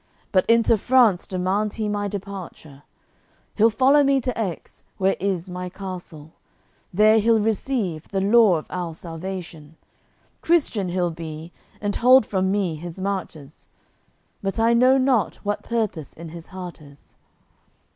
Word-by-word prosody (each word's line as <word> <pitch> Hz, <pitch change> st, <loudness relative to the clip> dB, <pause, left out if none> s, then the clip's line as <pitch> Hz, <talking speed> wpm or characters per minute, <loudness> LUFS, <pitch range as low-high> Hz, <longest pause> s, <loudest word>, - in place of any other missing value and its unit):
But 185 Hz, -2 st, +2 dB
into 230 Hz, -1 st, +4 dB
France 235 Hz, -6 st, +3 dB
demands 190 Hz, +3 st, -1 dB
he 220 Hz, -2 st, -2 dB
my 205 Hz, 0 st, -2 dB
departure; 190 Hz, -8 st, -8 dB, 0.7 s
He'll 225 Hz, +1 st, +4 dB
follow 265 Hz, +6 st, +4 dB
me 275 Hz, 0 st, +3 dB
to 250 Hz, +1 st, -2 dB
Aix, 195 Hz, -7 st, -5 dB
where 195 Hz, 0 st, +2 dB
is 190 Hz, -2 st, -2 dB
my 180 Hz, 0 st, -6 dB
Castle; 180 Hz, -5 st, -9 dB, 0.6 s
There 215 Hz, +4 st, +5 dB
he'll 225 Hz, +1 st, +3 dB
receive 210 Hz, -, -2 dB
the 195 Hz, -, -2 dB
law 205 Hz, -1 st, +5 dB
of 155 Hz, -, -7 dB
our 175 Hz, -3 st, -4 dB
Salvation: 165 Hz, -2 st, -8 dB, 0.7 s
Christian 275 Hz, -, +1 dB
he'll 175 Hz, -1 st, 0 dB
be, 160 Hz, 0 st, -8 dB, 0.3 s
and 205 Hz, -1 st, -2 dB
hold 255 Hz, 0 st, +6 dB
from 190 Hz, -2 st, 0 dB
me 190 Hz, -5 st, -1 dB
his 170 Hz, +3 st, -8 dB
marches. 180 Hz, -7 st, -5 dB, 0.7 s
But 195 Hz, +2 st, -3 dB
I 230 Hz, +1 st, +4 dB
know 255 Hz, +3 st, +5 dB
not 255 Hz, -6 st, +1 dB
what 205 Hz, 0 st, -1 dB
purpose 215 Hz, -10 st, -3 dB
in 165 Hz, 0 st, -10 dB
his 165 Hz, 0 st, -10 dB
heart 180 Hz, -3 st, -9 dB
is." 140 Hz, -1 st, -18 dB
195 Hz, 145 wpm, -23 LUFS, 175-220 Hz, 0.7 s, hold